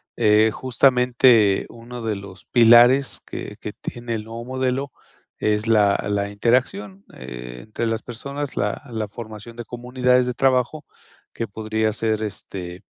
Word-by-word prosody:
Eh, 110 +1 +4
justamente 125 -5 +3
uno 120 +1 -9
de 110 -2 -1
los 100 -1 -11
pilares 120 +3 +5
que - - -7
que - - -6
tiene 120 -1 -5
el 105 0 -5
nuevo 115 +1 -7
modelo 130 +1 -2 0.5
es 105 0 0
la 105 -3 +4
la 100 0 0
interacción 100 -3 0
entre 60 - -6
las 115 0 -2
personas, 140 +4 -6
la 105 +7 -2
la 110 -2 -3
formación 110 +1 -9
de 120 -1 -7
comunidades 125 +1 +1
de 125 - -1
trabajo, 135 +3 +1 0.5
que 115 - -4
podría 110 +1 -1
ser, 110 -1 -1
este, 95 -3 -6
115 Hz, 140 wpm, -22 LUFS, 105-125 Hz, 0.5 s, pilares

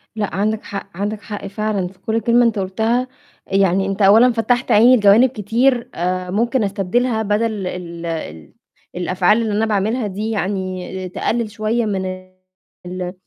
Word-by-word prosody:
لأ 210 -2 -3
عندك 215 +3 -1
حق، 200 0 -7
عندك 205 +1 -3
حق 205 -1 -7
فعلًاً 200 -2 -2
في 185 +1 -16
كل 220 +4 -1
كلمة 240 +1 +4
أنت 225 -3 +1
قُلتها 220 +6 0 0.4
يعني 195 -1 +2
أنت 195 +1 -3
أولاً 220 +6 +6
فتّحت 240 +3 0
عيني 240 +4 +7
لجوانب 210 +5 +5
كتير، 235 +3 0
آآ 180 +1 -2
ممكن 230 +4 +1
أستبدلها 220 +4 0
بدل 210 -2 -1
ال 170 -2 -6
ال 120 - -6 0.4
الأفعال 185 +4 +2
اللي 220 -2 -1
أنا 215 +2 +1
باعملها 215 +2 0
دي 205 +3 -4
يعني 190 -3 -3
تقلل 225 +4 -2
شوية 220 +2 -1
من 195 -3 -2
ال 185 -1 -9
205 Hz, 155 wpm, -19 LUFS, 185-225 Hz, 0.4 s, عيني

